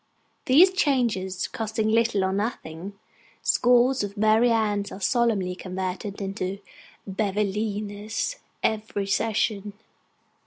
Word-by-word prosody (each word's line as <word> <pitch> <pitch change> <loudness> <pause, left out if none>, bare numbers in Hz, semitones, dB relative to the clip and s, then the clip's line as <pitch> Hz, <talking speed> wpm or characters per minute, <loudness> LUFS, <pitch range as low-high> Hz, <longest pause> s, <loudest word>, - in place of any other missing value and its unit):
These 330 +7 +6
changes 235 - 0
costing 220 0 -2
little 225 -2 +2
or 190 0 0
nothing, 195 -3 -4 0.5
scores 250 0 +4
of 200 +1 -5
Mary 220 +3 +4
Annes 210 -3 0
are - - -7
solemnly 215 -5 +1
converted 185 +2 -5
into 195 -1 -3 0.5
Bevelinas 210 - -2 0.3
every 215 -2 -1
session. 205 0 0
210 Hz, 95 wpm, -25 LUFS, 195-230 Hz, 0.5 s, These